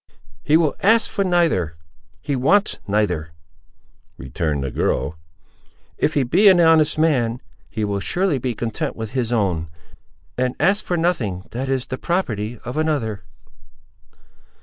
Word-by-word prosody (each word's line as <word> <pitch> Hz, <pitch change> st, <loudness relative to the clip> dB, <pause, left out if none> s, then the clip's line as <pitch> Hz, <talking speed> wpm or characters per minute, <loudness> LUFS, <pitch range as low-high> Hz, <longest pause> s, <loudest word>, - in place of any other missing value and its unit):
"He 150 Hz, +2 st, +4 dB
will 160 Hz, -3 st, +2 dB
ask 220 Hz, +3 st, +3 dB
for 200 Hz, -, 0 dB
neither:—he 85 Hz, -, -2 dB
wants 195 Hz, +11 st, +2 dB
neither," 90 Hz, -6 st, -1 dB, 0.8 s
returned 70 Hz, +2 st, -3 dB
the 70 Hz, -, -3 dB
girl; 65 Hz, +5 st, -1 dB, 0.8 s
"if 155 Hz, -, +1 dB
he 140 Hz, -, +3 dB
be 175 Hz, -, +4 dB
an 185 Hz, -2 st, +5 dB
honest 160 Hz, -2 st, +4 dB
man, 125 Hz, -7 st, +1 dB, 0.3 s
he 110 Hz, -1 st, -2 dB
will 100 Hz, -1 st, -2 dB
surely 175 Hz, -, 0 dB
be 125 Hz, -1 st, -3 dB
content 115 Hz, 0 st, -3 dB
with 110 Hz, -1 st, -6 dB
his 125 Hz, -3 st, -2 dB
own, 90 Hz, -8 st, 0 dB, 0.7 s
and 125 Hz, 0 st, 0 dB
ask 200 Hz, +3 st, +2 dB
for 175 Hz, -, -1 dB
nothing 120 Hz, -, -1 dB
that 130 Hz, +3 st, -4 dB
is 130 Hz, -2 st, 0 dB
the 130 Hz, -, -6 dB
property 115 Hz, -, -2 dB
of 125 Hz, +4 st, -5 dB
another." 120 Hz, -10 st, -1 dB
125 Hz, 140 wpm, -21 LUFS, 100-160 Hz, 0.8 s, an